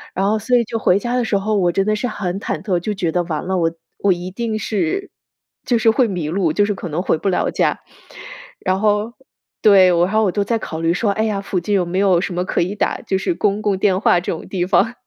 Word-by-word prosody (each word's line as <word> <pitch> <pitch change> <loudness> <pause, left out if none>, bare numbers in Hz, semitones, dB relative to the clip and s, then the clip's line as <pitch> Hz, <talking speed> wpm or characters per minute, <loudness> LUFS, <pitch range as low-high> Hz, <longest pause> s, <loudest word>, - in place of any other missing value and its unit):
然 195 +2 +1
后 215 +1 +1
所 245 +4 +2
以 240 - +2
就 225 0 -4
回 180 - +3
家 240 +4 -2
的 250 - +1
时 220 -3 +1
候， 210 +2 -1
我 180 -3 +2
真 195 +2 0
的 215 0 +1
是 235 +4 -2
很 190 -5 -3
忐 - - -4
忑， 185 -4 0
就 210 +4 -3
觉 175 -4 -1
得 180 - +1
完 160 -1 -3
了， 190 +1 -1
我 165 -2 +1 0.3
我 200 - +2
一 175 +1 -6
定 220 +2 -3
是， 210 - -2 0.6
就 245 - +1
是 225 - +4
会 240 +2 +3
迷 175 -7 -3
路， 170 -2 0
就 205 - +3
是 205 - -1
可 180 - -6
能 160 +3 -2
回 180 - +1
不 195 - -1
了 185 - 0
家。 - - 0 0.8
然 185 0 0
后 210 +2 +1 0.5
对， 195 -3 +6
我 170 0 +3
还 215 +4 +1
我 195 - +2
都 205 +2 0
在 230 +2 -1
考 160 -6 -6
虑 165 +1 +2
说， 205 +4 0
哎 215 +2 -1
呀， 205 -3 -1
附 195 -2 -2
近 190 +4 -3
有 190 - +2
没 175 +2 -3
有 190 -3 +3
什 195 - -3
么 180 +1 -1
可 - - 0
以 185 +4 -2
打， - - -1
就 190 - -1
是 270 - -1
公 205 -9 0
共 205 -2 +1
电 190 -1 +2
话 180 - +3
这 175 - -4
种 165 - -6
地 180 -2 -1
方， 200 +5 +2
195 Hz, 290 characters per minute, -19 LUFS, 180-215 Hz, 0.8 s, 对